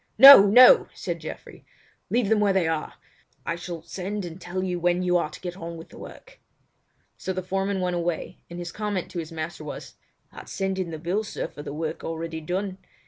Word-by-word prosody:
"No! 270 -4 +11
No!" 255 - +8
said - - -4
Geoffrey, - - -9 0.5
"leave 240 -3 +1
them 220 +1 +3
where 205 -1 +3
they 185 -4 +2
are. 160 -1 -3 0.5
I - - -1
shall 170 -1 -7
send 190 +3 -5
and 175 +2 -9
tell 185 +2 -4
you 180 -2 -2
when 175 +1 +1
you 180 0 +1
are 170 - -1
to - - -11
get 180 -1 -6
on 170 -2 -7
with 165 - -11
the - - -13
work." - - -13 0.8
So 190 - -3
the 185 0 -4
foreman 195 +1 -2
went 180 -1 -1
away, 175 -1 -3
and 170 - -8
his 175 0 -6
comment 205 -4 -3
to 175 - -4
his 160 0 -6
master 160 0 -6
was: 150 - -8 0.4
"I'd - - -11
send 190 0 -2
in 185 -2 -2
the 160 - -6
bill, 180 +7 -2
sir, 205 - -5
for - - -11
the 145 - -7
work 155 +2 -4
already 165 0 -5
done. 185 +4 -3
180 Hz, 215 wpm, -25 LUFS, 165-195 Hz, 0.8 s, No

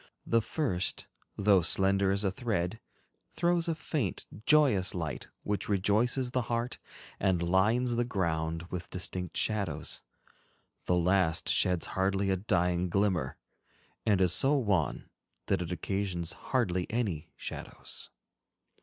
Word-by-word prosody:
The 115 0 +3
first, 110 - -1 0.3
though 100 -2 +5
slender 95 +3 +3
as 100 +1 +2
a 95 - +1
thread, 100 -2 -2 0.5
throws 175 0 +1
a 165 - 0
faint, 140 - -2 0.2
joyous 130 -13 +4
light 80 -5 -4 0.2
which 105 -1 -2
rejoices 110 +6 +2
the 125 - +1
heart 120 +1 -1 0.4
and 95 -3 +2
lines 110 +7 +3
the 120 - +2
ground 85 -7 -1
with 90 -1 -5
distinct 90 -1 -3
shadows; 100 -8 -1 0.9
the 90 - +3
last 90 -1 +2
sheds 90 -2 +3
hardly 95 +1 +1
a - - +3
dying 90 -2 +1
glimmer, 90 -8 0 0.7
and 100 -4 +3
is 90 -2 +3
so 140 +2 +4
wan 100 - 0 0.4
that - - +1
it 90 0 -4
occasions 90 0 -2 0.2
hardly 95 -9 +1
any 95 -9 -2
shadows. - - -7
95 Hz, 125 wpm, -30 LUFS, 90-115 Hz, 0.9 s, though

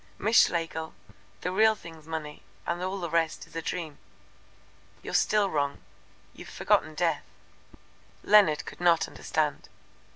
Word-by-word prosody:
Miss 220 +3 +5
Schlegel, 160 - -4 0.5
the 180 - -2
real 220 +3 +4
thing's 160 -5 -13
money 155 -2 -6 0.2
and 175 +1 -2
all 190 +2 -3
the 175 - -3
rest 165 -1 0
is - - -19
a 165 - -2
dream." 160 -3 -5 1.0
"You're - - -6
still 210 -2 +3
wrong. 140 - -1 0.6
You've - - -11
forgotten 155 0 +1
Death." 170 +1 +1 1.0
Leonard 200 -8 +5
could - - -10
not 170 -2 +4
understand. - - -2
165 Hz, 135 wpm, -28 LUFS, 155-185 Hz, 1.0 s, Miss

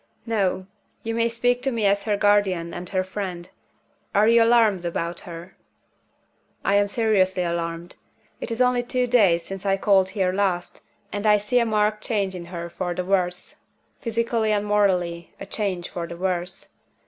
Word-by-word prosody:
"No. 195 -5 0 0.4
You 225 - -3
may 230 0 +1
speak 245 +1 0
to 270 +1 -1
me 230 -3 -1
as 200 0 +2
her 210 -2 +1
guardian 200 -5 +2
and 175 0 -7
her 185 -1 0
friend. 185 -2 -5 0.7
Are 210 +2 +5
you 230 0 +6
alarmed 225 -5 +4
about 170 0 -2
her?" 170 +2 -9 1.1
"I 195 - +2
am 205 0 +3
seriously 200 -4 +1
alarmed. 170 0 -4 0.4
It - - -5
is 230 +2 -2
only 250 0 +2
two 250 +1 -1
days 200 -9 +3
since 195 -1 -6
I 195 -1 +1
called 195 -1 +3
here 185 -2 +1
last, 190 -3 -1 0.3
and 205 +1 -1
I 210 0 +6
see 210 +5 +1
a 235 - +1
marked 215 0 +1
change 200 -4 -1
in 175 -2 -7
her 170 -1 -6
for 175 0 -4
the 180 - -3
worse 180 -2 -1 0.4
physically 230 -1 0
and 210 -1 +1
morally, 180 -5 0
a - - -7
change 190 -5 -3
for 170 -1 -5
the 170 +1 -8
worse. 180 0 -3
195 Hz, 175 wpm, -24 LUFS, 180-220 Hz, 1.1 s, you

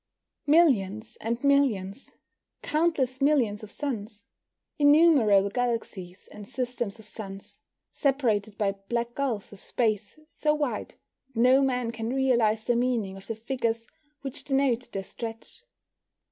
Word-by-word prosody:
Millions 230 - +3
and 235 +3 -2
millions 270 -6 +1 0.5
countless 295 -5 0
millions 255 -8 +2
of 215 - -9
suns. 215 -6 -5 0.5
Innumerable 285 -10 +5
galaxies 220 -6 -3
and 210 -1 -10
systems 245 -5 -3
of 220 - -12
suns, 195 -3 -9 0.3
separated 225 -8 0
by 200 -2 +1 0.2
black 235 0 -1
gulfs 240 -8 -2
of 200 - -12
space 215 0 -1
so 300 -1 0
wide 290 -4 -3 0.4
that - - -2
no 255 +3 +6
man 250 -3 0
can 225 -1 -4
realise 235 -5 +2
the 240 +1 +1
meaning 235 -6 0
of 195 - -12
the 225 - -3
figures 230 -1 -2 0.4
which 275 0 -6
denote 270 -3 0
their 195 - -3
stretch. 225 - -8
235 Hz, 130 wpm, -27 LUFS, 210-270 Hz, 0.5 s, no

